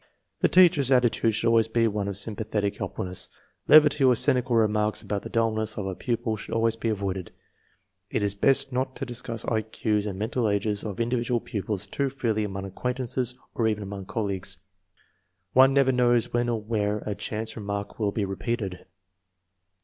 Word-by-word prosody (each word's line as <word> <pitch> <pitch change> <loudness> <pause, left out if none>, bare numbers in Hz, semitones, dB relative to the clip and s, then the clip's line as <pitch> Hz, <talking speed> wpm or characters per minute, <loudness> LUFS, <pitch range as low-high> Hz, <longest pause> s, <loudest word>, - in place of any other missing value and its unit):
The - - +3
teacher's 170 -8 +5
attitude 120 -4 +3
should 115 - -2
always 115 -1 +4
be 115 0 +2
one 105 -2 -2
of 100 -2 -2
sympathetic 105 -1 -2
helpfulness. 90 -2 -4 0.4
Levity 150 -1 +6
or 130 -2 +6
cynical 125 -1 +2
remarks 105 -1 +1
about 100 -1 -3
the - - -8
dullness 110 -1 0
of 105 - -3
a 95 - -3
pupil 115 +2 -2
should - - -6
always 115 0 +2
be 115 0 -2
avoided, 95 -3 -3 0.8
It 105 - -1
is 100 -1 0
best 135 +5 +3
not 130 +1 -1
to - - -4
discuss 120 -2 -4
I 110 -1 +1
Q's 105 -1 -1
and 95 -2 -4
mental 110 +2 -1
ages 100 0 -1
of 105 -2 -5
in 115 0 0
dividual 120 0 0
pupils 105 -2 -3
too 135 +7 -2
freely 115 -5 -1
among 95 -1 -4
acquaintances 125 +4 -2 0.2
or 115 - +1
even 105 -1 -1
among 100 -1 -7
colleagues. 100 -3 -3 1.0
One 130 +1 +7
never 135 -1 +4
knows 120 -2 +2
when 120 0 +1
or 115 -2 0
where 105 -1 -2
a 105 - -2
chance 110 +2 -4
remark 100 -1 -5
will 105 -2 +1
be 105 0 -1
repeated. 95 -2 -4
110 Hz, 180 wpm, -26 LUFS, 100-120 Hz, 1.0 s, One